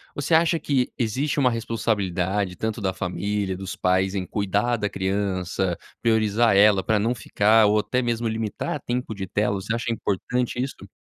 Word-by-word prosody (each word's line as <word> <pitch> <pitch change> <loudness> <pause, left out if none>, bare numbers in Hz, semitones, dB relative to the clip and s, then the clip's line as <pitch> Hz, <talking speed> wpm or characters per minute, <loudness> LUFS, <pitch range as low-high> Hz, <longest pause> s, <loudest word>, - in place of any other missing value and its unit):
Você 145 +3 -1
acha 165 +1 +4
que 130 -4 0
existe 130 +6 -1
uma 130 -3 +4
responsabilidade 100 -5 -1
tanto 110 +2 -3
da 95 - 0
família, 95 +1 -2
dos 95 0 -6
pais 95 +1 +1
em 95 -2 -2
cuidar 105 +5 0
da 105 -1 -1
criança, 95 -2 -1 0.2
priorizar 110 -1 +3
ela 100 -2 +5
pra 110 -1 +2
não 115 +4 +1
ficar, 110 -1 +3
ou 105 - +3
até 125 +4 0
mesmo 120 -1 -1
limitar 110 +5 -3
tempo 125 -1 -3
de 95 -2 -5
tela. 100 +2 0
Você 110 +4 -2
acha 115 0 -2
importante 120 +4 -2
isto? 130 -7 -6
105 Hz, 170 wpm, -24 LUFS, 95-120 Hz, 0.2 s, ela